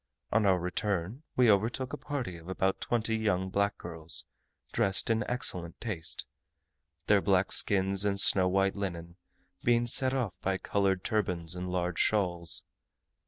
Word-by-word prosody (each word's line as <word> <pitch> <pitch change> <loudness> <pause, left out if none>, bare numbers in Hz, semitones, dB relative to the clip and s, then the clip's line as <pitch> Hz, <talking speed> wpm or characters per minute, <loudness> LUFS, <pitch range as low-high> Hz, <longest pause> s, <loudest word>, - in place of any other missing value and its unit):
On 105 -1 +3
our 95 -1 +4
return 95 - -3
we 125 -3 +5
overtook 115 +7 0
a - - -3
party 135 -13 -4
of 85 +1 -12
about 95 0 -1
twenty 115 -1 0
young 95 -4 -1
black 100 +1 0
girls, 80 -1 -5 0.5
dressed 95 +3 +2
in 110 -1 +1
excellent 90 -9 0
taste; 95 -9 -3 0.8
their 105 -1 +4
black 95 -1 +2
skins 95 0 +3
and 100 -1 0
snow 95 -1 +5
white 95 +1 +1
linen 85 -3 -5 0.5
being 120 0 +3
set 130 +2 +4
off 120 -9 -1
by 95 0 0
coloured 95 -1 0
turbans 90 -7 -1
and 90 0 -5
large 90 -1 -2
shawls. 85 -6 0
95 Hz, 150 wpm, -30 LUFS, 90-110 Hz, 0.8 s, we